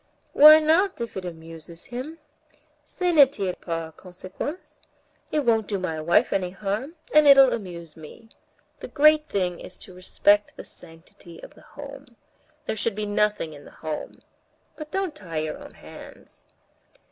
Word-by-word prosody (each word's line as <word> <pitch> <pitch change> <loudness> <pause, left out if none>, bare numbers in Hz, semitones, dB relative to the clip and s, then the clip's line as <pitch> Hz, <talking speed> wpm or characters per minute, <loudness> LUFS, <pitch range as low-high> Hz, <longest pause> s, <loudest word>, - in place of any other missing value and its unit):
"Why 305 +2 +9
not, 325 +4 +2
if 235 -1 -6
it 190 - -5
amuses 165 0 -10
him? 260 +7 -7 0.7
Ça 360 +1 -1
ne 290 -4 +7
tire 195 -9 -3
pas 165 -2 -6
à - - -38
conséquence. 185 - -8 0.5
It 300 - +1
won't 225 -3 +2
do 205 - -2
my 165 -4 -4
wife 170 +2 +2
any 185 -2 -1
harm, 205 - -4 0.2
and 305 0 +6
it'll 275 -2 +7
amuse 170 -7 -7
me. 160 +8 -14 0.5
The - - -8
great 305 +1 +3
thing 180 -3 -2
is 180 - -11
to 190 - -14
respect 205 +3 +1
the - - -8
sanctity 165 0 -13
of - - -12
the - - -19 0.2
home. 280 -3 -11 0.5
There - - -3
should 220 0 -2
be 210 0 -3
nothing 205 -5 -1
in 145 -1 -13
the - - -14 0.2
home. 155 -1 -6 0.5
But 305 -1 -9
don't 380 -1 -2
tie 175 - -8
your 155 0 -3
own - - -13
hands." - - -13
205 Hz, 165 wpm, -24 LUFS, 175-285 Hz, 0.7 s, Why